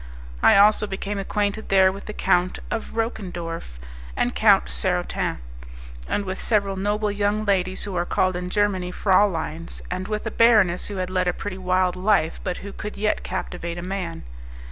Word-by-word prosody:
I - - +6
also 210 +1 +5
became 200 +1 -4
acquainted 205 +2 -2
there 190 -1 +5
with 195 +1 -9
the 210 - -5
Count 185 -2 +1
of 225 - -4
Roquendorf 175 - -4 0.4
and - - +1
Count - - +5
Sarotin, 60 0 -1 0.7
and 205 - -1
with 190 0 -4
several 200 -3 +1
noble 205 +2 0
young 205 +1 0
ladies 185 -2 +1
who 200 -3 -4
are 175 - +1
called 185 +1 +1
in 180 0 -4
Germany 195 -2 0
frauleins, 180 -4 +1
and 185 +1 -3
with 215 0 -3
a 225 - -2
baroness 210 -7 +4
who 205 - -6
had 185 -1 -3
led 185 -1 +1
a 180 - +2
pretty 190 0 -6
wild 185 0 +1
life, 185 -3 +1
but 180 - -2
who 200 - -7
could 210 - -7
yet 210 +1 0
captivate 175 -2 -5
a 175 - -5
man. 180 -3 -4
190 Hz, 175 wpm, -23 LUFS, 180-205 Hz, 0.7 s, I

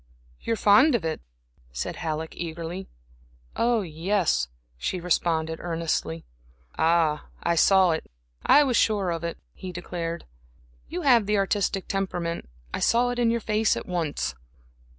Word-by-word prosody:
"You - - -1
are - - -1
fond 235 +9 +6
of 195 -8 -1
it?" 160 - -2 0.5
said - - -4
Halleck, 160 0 -3
eagerly. 170 +2 -5 0.7
"Yes," 190 - +1 0.3
she 180 - -2
responded, 160 -2 0
earnestly. 165 - -2 0.5
"Ah, 160 -2 +2 0.2
I 170 - +2
saw 185 +2 +5
it 160 - -3 0.3
I 295 - +7
was 260 -4 +1
sure 205 -6 +2
of 165 0 -3
it," 170 0 -3 0.2
he 185 - -7
declared. 170 -1 -5 0.6
"You 350 +1 -4
have 240 -7 +5
the 210 0 +2
artistic 195 -1 0
temperament. 175 - -2 0.2
I - - -1
saw 245 +1 +3
it 245 - -3
in 235 -1 +3
your 230 0 0
face 215 0 +1
at - - -5
once." 160 - -2
175 Hz, 145 wpm, -26 LUFS, 165-210 Hz, 0.7 s, I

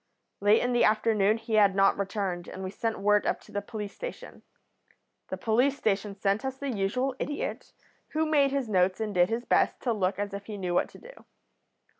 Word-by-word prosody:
"Late 205 +2 +4
in 245 0 0
the 240 - +3
afternoon 215 -1 +3
he 225 0 -6
had 205 -3 +5
not 195 0 +4
returned, 195 -3 -3
and 190 - -7
we 185 - -4
sent 225 +2 -2
word 210 +1 +2
up - - 0
to - - -17
the 205 - -2
police 210 -1 -6
station. - - -8 0.9
The - - -4
police 250 +5 +2
station 200 -3 -1
sent 200 +3 0
us 265 0 -3
the 280 0 -3
usual 245 +6 -1
idiot, 290 0 -4 0.4
who 315 +1 +1
made 295 -3 +3
his 275 -2 -1
notes 185 -2 +2
and 215 -2 -2
did 180 0 +3
his 230 +2 -2
best - - +2
to 240 - 0
look 190 -3 0
as 205 -1 -3
if 200 0 -7
he 210 -2 -6
knew 180 -2 -2
what - - +1
to - - -14
do. - - -15
210 Hz, 210 wpm, -28 LUFS, 195-245 Hz, 0.9 s, had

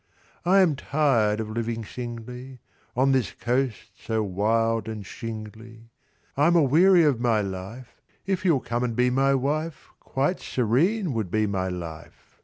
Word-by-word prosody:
"I 190 +2 +5
am 165 -6 +3
tired 130 -7 +1
of 110 -1 -4
living 115 0 -3
singly, 125 +3 -8 0.4
"On 135 +2 +3
this 130 -3 +1
coast 125 -1 -2
so 110 -1 -1
wild 110 +3 0
and 110 -3 -6
shingly, 115 +1 -9 0.4
"I'm 155 +5 +3
a 165 - +5
weary 170 +6 +5
of 145 -6 +2
my 115 -3 +2
life; 100 +6 -7 0.2
"If 190 -1 -1
you'll 165 -8 +3
come 120 +1 -2
and 120 -2 -2
be 125 +1 +2
my 135 +2 +3
wife, 150 +4 -2
"Quite 140 +7 -1
serene 150 - +1
would 110 -5 -2
be 110 +3 +1
my 95 -2 -1
life!" 85 -3 -8
120 Hz, 155 wpm, -25 LUFS, 110-140 Hz, 0.4 s, I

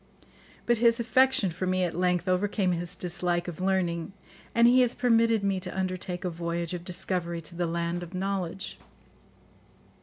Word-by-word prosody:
But 240 -2 +2
his 235 0 +4
affection 235 -4 +3
for 180 +3 -3
me 185 0 +1
at 175 - -1
length 180 0 +1
overcame 185 +1 +1
his 175 +1 -2
dislike 175 -1 -2
of 175 0 -6
learning, 185 -1 0 0.4
and 235 0 +6
he 255 +1 +6
has 245 -1 +2
permitted 230 -3 +3
me 195 -1 +1
to 185 - -6
undertake 185 0 -3
a - - +1
voyage 170 0 -3
of 175 -1 -5
discovery 175 -1 -3
to 170 +2 -9
the 175 0 -1
land 170 +1 -2
of 175 +1 -8
knowledge." 190 -1 -3
185 Hz, 170 wpm, -28 LUFS, 175-200 Hz, 0.4 s, and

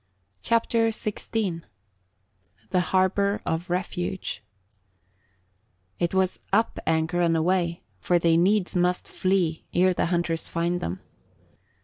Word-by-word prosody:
CHAPTER 230 0 +2
XVI 215 -4 -2 1.1
THE 180 - +3
HARBOUR 190 +3 +1
OF 165 +3 -2
REFUGE 180 - -3 1.6
It 175 +1 0
was 190 -1 +1
up 220 +3 +2
anchor 160 +2 +1
and 165 -1 +3
away, 170 0 0 0.2
for 175 - +2
they 165 -1 +3
needs 190 +3 +2
must 180 0 +1
flee 185 -4 0
ere 185 +1 +4
the - - 0
hunters 170 -2 -1
find 170 +1 -1
them. 90 +3 -4
180 Hz, 110 wpm, -25 LUFS, 170-190 Hz, 1.6 s, ere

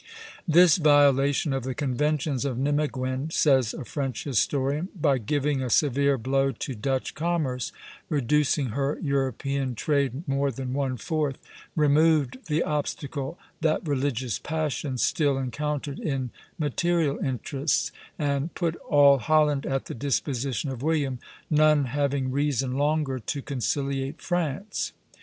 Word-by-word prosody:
"This 170 0 +6
violation 145 -2 +4
of 135 - -1
the 130 +1 -4
conventions 145 0 0
of 135 -4 -2
Nimeguen," 135 0 -1
says 130 -8 +3
a - - -7
French 135 -2 -3
historian, 140 - 0
"by 140 -4 +3
giving 145 +4 0
a 130 - -2
severe 140 +1 +3
blow 135 +3 +1
to 135 - -5
Dutch 130 +4 -2
commerce, 150 -7 -1 0.4
reducing 145 0 +1
her 135 +5 -1
European 135 -2 -1
trade 140 - 0
more 140 +1 +1
than 130 0 -4
one 135 -2 -1
fourth, 150 - -1 0.4
removed 150 -3 +3
the 155 +1 +1
obstacle 145 0 -3 0.2
that 160 +1 +1
religious 130 -5 -1
passions 150 -4 -2
still 145 -4 +2
encountered 145 +2 -3
in 135 -5 -2 0.3
material 160 0 0
interests, 135 +3 -1 0.3
and 145 +1 -1
put 170 -2 -1
all 140 -2 +5
Holland 150 -1 +2
at 135 0 -1
the - - -6
disposition 135 +1 -1
of 125 -2 -6
William, 145 -4 0 0.3
none 150 -1 +4
having 140 0 -1
reason 135 -2 0
longer 145 -2 0
to 140 +5 -4
conciliate 135 +2 -2
France." 175 +2 -2
140 Hz, 130 wpm, -26 LUFS, 130-150 Hz, 0.4 s, This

